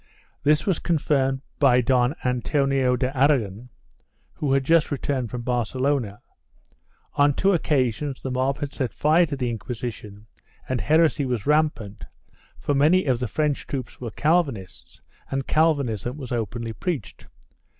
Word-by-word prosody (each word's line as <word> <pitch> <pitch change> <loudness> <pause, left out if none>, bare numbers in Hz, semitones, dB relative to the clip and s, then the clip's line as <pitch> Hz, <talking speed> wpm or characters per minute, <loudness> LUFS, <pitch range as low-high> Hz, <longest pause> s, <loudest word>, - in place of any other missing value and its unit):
This 150 +1 +2
was 190 -5 +1
confirmed 140 -4 0 0.2
by 130 -3 +5
Don 125 +2 +2
Antonio 130 +1 +1
de 125 +2 -2
Aragon, 125 -5 +1 0.6
who 145 -3 -2
had 135 0 +2
just 165 +3 +3
returned 135 -4 -2
from 120 +1 -5
Barce 125 -1 -2
lona; 130 -6 -1 0.9
on 145 -1 +3
two 195 +1 +3
occasions 140 - 0
the 130 - -5
mob 130 +2 0
had 145 -1 -5
set 130 -5 -3
fire 160 +3 +3
to 150 - -3
the 125 -3 -2
Inquisition 110 -3 -6 0.4
and 130 -3 -1
heresy 155 - +3
was 125 -5 -2
rampant, 150 -9 0 0.5
for 145 - -1
many 155 +6 +4
of 130 -4 +1
the 125 - -2
French 150 +6 -1
troops 130 -4 -6
were 120 - -4
Calvinists 145 - -1 0.3
and 135 -1 -2
Calvinism 140 - +1
was 135 -3 -8
openly 115 0 -3
preached. 165 - -5
135 Hz, 145 wpm, -24 LUFS, 120-150 Hz, 0.9 s, by